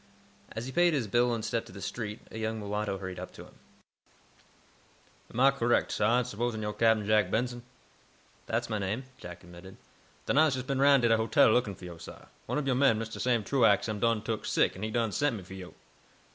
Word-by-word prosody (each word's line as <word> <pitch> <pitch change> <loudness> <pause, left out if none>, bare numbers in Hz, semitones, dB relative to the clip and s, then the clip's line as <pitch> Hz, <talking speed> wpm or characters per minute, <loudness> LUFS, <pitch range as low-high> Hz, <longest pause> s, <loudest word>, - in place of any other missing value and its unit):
As 110 +2 -5
he 130 - -6
paid 175 +1 +3
his 130 -5 0
bill 120 +4 +2
and 115 -2 -2
stepped 115 -1 -2
to - - -12
the 100 - -10
street, 105 +2 -5
a 110 - -6
young 110 0 -2
mulatto 105 -1 -3
hurried 95 -1 -6
up - - -7
to - - -11
him. - - -18 1.8
"Am 115 - -5
Ah 135 +2 +6
correct, 120 -3 +1
sah, 115 +4 +2
in 125 - +1
supposin' 115 -1 -3
yo' 105 0 -2
Cap'n 110 -2 +2
Jack 105 -3 +3
Benson?" 120 +3 -1 0.9
"That's - - -1
my 110 -2 -2
name," 105 +6 -2 0.2
Jack 90 0 -10
admitted. 90 +2 -13 0.5
"Den 140 - +2
Ah's 155 -3 +4
jes' 130 -1 -4
been 135 0 -2
'roun' 140 -2 +5
to - - +5
de 115 - +4
hotel, 110 0 +4
lookin' 110 -4 +1
fo' 90 - -12
yo', 85 -2 -9
sah. 85 - -11 0.2
One - - -1
ob 150 - -1
yo' 130 - +2
men, 130 -3 +4
Mistah 115 0 -5
Sam 120 -3 +1
Truax, 115 -3 +3
am 110 -2 -3
done 115 -1 +1
took 110 -2 -3
sick, - - +2
an' 95 - -9
he 110 - -2
done 115 -1 0
sent 145 +3 0
me 100 - -7
fo' 95 - -11
yo'." 95 -2 -10
110 Hz, 230 wpm, -29 LUFS, 105-125 Hz, 1.8 s, Ah